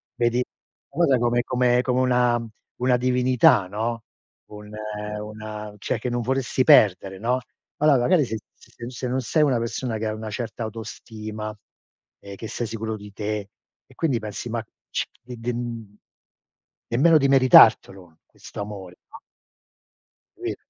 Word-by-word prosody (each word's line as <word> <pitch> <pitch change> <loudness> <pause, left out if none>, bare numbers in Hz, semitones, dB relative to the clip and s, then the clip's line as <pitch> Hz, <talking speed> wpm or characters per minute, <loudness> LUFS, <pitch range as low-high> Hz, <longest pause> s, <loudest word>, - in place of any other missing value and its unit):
vedi 120 +1 +1
la 125 - -9
cosa 145 -7 +4
come 120 0 +1
come 125 -1 +2
come 125 0 0
una 125 -2 +2 0.4
una 125 -1 +3
divinità, 125 - +3
no? 115 +3 -3 0.5
Un, 105 0 -10 0.5
una 105 0 -7
cioè, 105 - -2
che 125 - -3
non 120 0 -1
vorresti 130 +1 0
perdere, 95 -1 +5
no? 125 +4 0 0.4
Allora 150 -2 +4
magari 150 +4 +3
se 110 -2 -4 0.2
se 120 0 -11
se 125 0 -5
non 130 +1 -1
sei 150 +6 +2
una 130 -5 +2
persona 115 0 -3
che 110 0 -2
ha 110 - -2
una 110 0 -6
certa 115 +1 -5
autostima 110 -1 -7 0.6
e 100 0 -10
che 110 - -7
sei 120 - -3
sicuro 110 0 -4
di 105 -1 -12
te 105 -1 -4 0.4
e - - -21
quindi 140 -8 0
pensi, 110 +2 -6
ma 115 0 -2 0.3
ci - - -1 0.2
e 125 0 -8
den 115 -3 -5 0.9
nemmeno 155 +7 +4
di 140 - +2
meritartelo 95 -10 +5
questo - - -12
amore, 95 -3 -8
no? - - -11 1.2
Capito? - - -4
115 Hz, 150 wpm, -24 LUFS, 105-125 Hz, 1.2 s, perdere